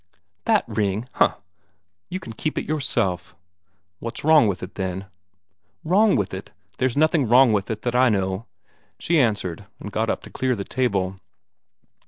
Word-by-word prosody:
"That - - +3
ring! 105 +3 -1
Huh! - - +3 0.7
You 185 - -3
can 170 -12 -9
keep 155 +7 -3
it - - -1
yourself." 100 - -1 0.6
"What's 115 - -6
wrong 155 -6 +6
with 90 -3 -2
it, 90 - -7
then?" 95 0 -3 0.8
"Wrong 195 +6 +4
with 100 -2 -1
it? 95 +1 -7 0.3
There's 130 0 +1
nothing 155 -3 +3
wrong 120 0 +6
with 100 -1 0
it 110 -1 -4
that 120 - -1
I 125 0 +5
know," 95 +1 -1 0.5
she 170 -2 +1
answered, 100 -8 -1
and - - -7
got - - 0
up - - -2
to - - -11
clear 130 -1 0
the 100 - -4
table. 95 -6 -1
115 Hz, 165 wpm, -23 LUFS, 95-135 Hz, 0.8 s, wrong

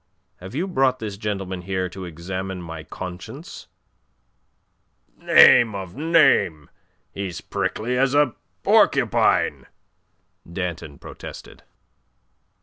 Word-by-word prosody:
Have 95 +6 -10
you 170 +6 0
brought 135 -8 +1
this 110 -4 -5
gentleman 95 -3 -4
here 95 0 -2
to 95 +1 -8
examine 95 +3 -5
my 80 -2 -7
conscience?" 90 +2 -9 1.5
"Name 115 -4 +6
of 95 -3 -7
a - - -9
name! 145 - +3 0.4
He's 100 -3 -5
prickly 125 +3 -2
as 135 +1 +2
a 145 -5 +3 0.3
porcupine!" - - +3 0.8
Danton 85 -5 -5
protested. - - -11
95 Hz, 100 wpm, -23 LUFS, 90-125 Hz, 1.5 s, Name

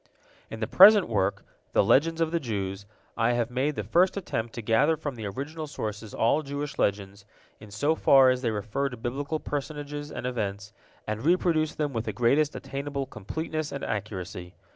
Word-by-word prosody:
In 110 - -8
the 110 - -1
present 200 - +8
work, 100 -3 -1 0.3
"The - - +4
Legends 165 +4 +3
of 160 -1 +1
the 170 - +1
Jews," 100 -6 -4 0.3
I 115 +1 +2
have 120 0 -1
made 135 +4 0
the 105 - -3
first 175 - +2
attempt 115 - -3
to 120 - -5
gather 140 +9 +3
from 145 -2 -4
the 110 -4 -6
original 150 +9 -5
sources 110 -6 -5
all 130 +7 +2
Jewish 145 0 -5
legends, 100 0 -1 0.4
in 105 - -12
so 125 +10 +1
far 135 -4 +6
as 125 0 -1
they 120 - 0
refer 110 +6 -2
to 125 - -9
Biblical 140 +7 -3
personages 145 0 -5
and - - -6
events, 105 -4 -3 0.3
and 110 +1 -4
reproduce 165 -2 +2
them 150 -2 -2
with 115 -1 -2
the - - -3
greatest 140 +5 +2
attainable 140 0 -4
completeness 155 - -5
and 140 - -5
accuracy. 95 -4 -5
130 Hz, 185 wpm, -27 LUFS, 110-150 Hz, 0.4 s, present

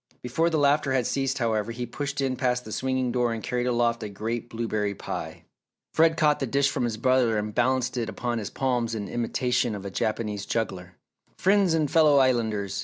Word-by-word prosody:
Before 160 +8 +1
the 160 - 0
laughter 145 -1 +2
had 130 -2 +1
ceased 135 -1 -1
however, 110 -3 0
he 120 +1 -4
pushed 140 +3 -4
in 130 -1 0
past 125 -1 0
the 110 - -8
swinging 130 +2 -1
door 120 -1 +1
and 115 - -6
carried 125 0 -1
aloft 120 -1 +1
a 105 - -4
great 115 +4 -4
blueberry 110 -3 -2
pie. - - -6 0.5
Fred 160 0 +4
caught 150 -2 +3
the 135 - -1
dish 140 +2 +2
from 125 - -1
his 115 -2 -2
brother 125 -2 +2
and 105 0 -3
balanced 125 +1 +1
it 115 -2 -1
upon 120 0 -2
his 105 - -5
palms 120 -3 -1
in 105 -2 -4
imitation 120 0 0
of 100 -1 -7
a 100 - -5
Japanese 105 -1 -2
juggler. 95 -5 -3 0.4
"Friends 195 -3 +3
and 155 -3 0
fellow 155 -3 +5
Islanders! 110 -7 +1
120 Hz, 200 wpm, -26 LUFS, 110-135 Hz, 0.5 s, fellow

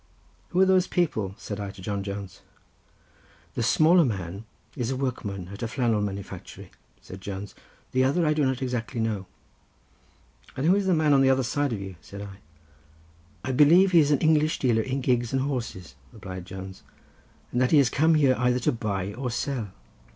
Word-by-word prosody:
"Who 180 - 0
are 190 - +7
those 185 -1 +3
people?" 110 - -1
said 105 -1 -6
I 100 -1 -4
to 100 - -12
John 100 0 -2
Jones. 100 -1 -7 1.1
"The - - -3
smaller 170 +3 +5
man 100 - -4 0.3
is 125 -5 -2
a 135 - -1
workman 100 -9 -4
at 100 - -9
a 115 - -1
flannel 115 -3 0
manufactory," 100 -1 -7 0.3
said 95 +1 -11
Jones. 100 0 -6 0.4
"The 130 0 +2
other 145 +6 +2
I 155 - +3
do 150 -1 +1
not 130 -1 0
exactly 125 -1 -3
know." 105 -4 -2 1.3
"And 135 - -1
who 180 +4 +5
is 200 -1 0
the 185 - +4
man 155 -2 +3
on 135 - +5
the 135 - +4
other 130 0 +3
side 145 +3 -1
of 110 - -3
you?" 95 -2 -8
said 100 +4 -9
I. 100 -1 -10 1.1
"I - - 0
believe 165 +8 +6
he 170 - +6
is 145 -2 +4
an 145 - +4
English 155 0 +3
dealer 120 -4 +2
in 130 +4 -2
gigs 120 -2 0
and 130 0 +1
horses," 120 -10 -4 0.2
replied 95 -5 -8
Jones, 95 0 -8 0.7
"and 125 - 0
that 130 - +3
he 155 - +5
is 140 -4 +4
come 160 +3 +3
here 140 -4 +4
either 125 0 +2
to - - +2
buy 100 -4 -3
or 125 +3 -4
sell." 120 -3 -3
125 Hz, 195 wpm, -26 LUFS, 100-145 Hz, 1.3 s, are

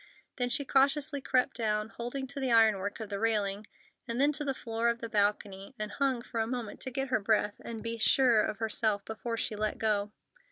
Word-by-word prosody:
Then 245 -2 0
she 280 +3 -1
cautiously 280 +1 +2
crept 255 0 +1
down, 215 -2 0
holding 245 +4 -5
to 280 +2 -7
the 260 -2 0
ironwork 215 -3 +3
of 220 -2 -6
the 200 - -2
railing, 210 -2 0 0.4
and 235 +1 -2
then 285 +2 +4
to 295 0 -2
the 270 -2 -1
floor 230 -1 -1
of 235 - 0
the 230 -1 -6
balcony, 205 0 -1
and 215 -2 -4
hung 265 -1 0
for 230 - -4
a 220 - +1
moment 240 -3 -5
to - - -3
get 270 +1 -2
her 250 - +2
breath 210 0 +1
and 225 -2 -6
be 230 0 -3
sure 240 -1 +5
of 210 - -2
herself 220 -2 0
before 230 +1 -4
she 220 - -2
let 215 0 -1
go. 210 -2 0
230 Hz, 215 wpm, -30 LUFS, 210-255 Hz, 0.4 s, sure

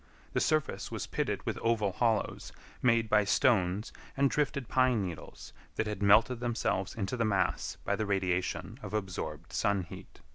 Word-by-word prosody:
The - - +2
surface 155 -2 0
was - - -3
pitted - - -2
with - - -2
oval 110 -4 +1
hollows, 110 +2 0 0.3
made 115 -2 +3
by 105 -1 +4
stones 100 -2 +2 0.2
and 140 0 +3
drifted 140 -4 0
pine 125 -4 +3
needles 85 -4 -8 0.2
that 110 - 0
had 105 -2 -4
melted 110 +5 +5
themselves 115 -5 -1
into 100 +1 -2
the 120 - 0
mass 100 -4 0
by - - +1
the 110 - -2
radiation 95 +3 -1
of 110 - -5
absorbed 90 -5 -4
sun 100 -3 +1
heat. 85 - -12
105 Hz, 160 wpm, -31 LUFS, 95-120 Hz, 0.3 s, melted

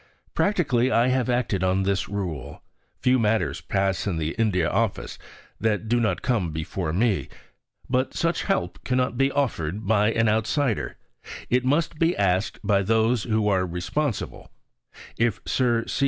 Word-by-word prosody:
Practically 140 - +2
I 120 +2 +3
have 130 -1 +1
acted 120 -6 0
on 95 +1 +2
this 95 0 0
rule. 80 -9 -5 0.4
Few 130 0 +3
matters 105 -10 +1
pass 95 0 -1
in 90 -5 -1
the 80 0 -1
India 100 -7 +1
Office - - -1 0.4
that 110 -1 0
do 120 +2 +2
not 105 -6 0
come 110 -9 +1
before 80 +1 -3
me. 105 +4 +1 0.6
But 130 +1 0
such 170 0 0
help 195 - -1
cannot 125 -1 0
be 135 +2 +2
offered 105 - -1
by 105 +1 +3
an 115 0 +2
outsider 110 +3 0 0.5
it 125 +1 +3
must 150 +3 +1
be 165 +1 +2
asked 95 +2 +1
by 100 -1 +3
those 110 +3 +2
who 110 -2 +1
are 95 -2 +2
responsible. 95 - -3 0.7
If 115 -3 +1
Sir 120 -3 +1
C. - - -3
110 Hz, 155 wpm, -25 LUFS, 95-125 Hz, 0.7 s, I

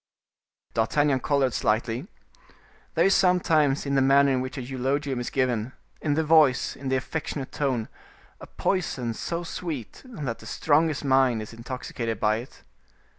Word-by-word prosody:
D'Artagnan 135 +4 +2
colored 135 -2 +1
slightly. 115 - 0 0.9
There - - +4
is 195 - +5
sometimes 160 -7 +3
in 140 - -1
the 135 - +3
manner 140 +1 +5
in 130 -1 +1
which 130 +1 -5
a - - -3
eulogium 135 +1 -2
is 120 - -3
given, 125 -2 -1 0.3
in 145 -2 0
the 160 - +1
voice, 155 -5 +4
in 135 -1 -5
the 130 - +2
affectionate 135 0 -4
tone, 130 -6 -1 0.5
a - - -10
poison 130 -11 -1
so 170 +9 -4
sweet, 160 - -6
that 150 - -5
the - - -11
strongest 155 -1 +1
mind 130 -4 +3
is 110 - -10
intoxicated 115 -2 -5
by 110 0 +2
it. 120 +3 -10
135 Hz, 155 wpm, -26 LUFS, 125-150 Hz, 0.9 s, is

